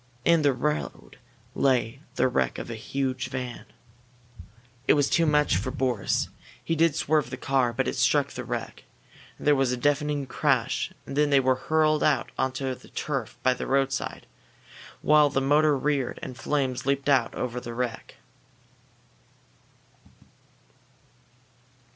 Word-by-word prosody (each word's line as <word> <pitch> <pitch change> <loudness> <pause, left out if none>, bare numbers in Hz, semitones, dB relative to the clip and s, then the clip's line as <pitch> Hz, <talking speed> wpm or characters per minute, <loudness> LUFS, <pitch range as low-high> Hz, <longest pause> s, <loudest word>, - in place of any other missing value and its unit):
In 170 -1 +5
the 145 -1 +4
road 150 0 -3 0.3
lay 130 -1 +1
the - - +3
wreck 125 - 0
of - - -6
a - - -4
huge 130 +3 -3
van. 125 -1 -5 1.2
It - - +6
was 145 -2 +2
too 165 -1 +2
much 150 - +3
for 105 +8 -2
Boris. 130 -6 -1 0.3
He 165 - -1
did 165 -1 +3
swerve 150 -5 +1
the 130 - -6
car, 130 -2 +1
but 115 - -1
it - - -2
struck - - +2
the - - -6
wreck. - - -5 0.5
There 150 - +3
was 135 -3 +2
a 125 - -1
deafening 145 +1 0
crash, - - 0
and - - -7
then 150 0 +3
they 140 -1 +5
were 130 0 +3
hurled 155 +3 +1
out - - +1
onto 130 0 -1
the - - -14
turf 135 -7 -4
by 130 - +4
the 125 - -6
roadside, 135 -1 -1 0.8
while 150 -1 +5
the 140 - 0
motor 145 +2 +3
roared 135 -2 -1
and 130 - -6
flames 135 -2 -2
leaped 140 0 0
out 140 -2 +2
over 125 0 -3
the 120 -1 -8
wreck. 125 -1 -4
135 Hz, 150 wpm, -26 LUFS, 125-150 Hz, 1.2 s, It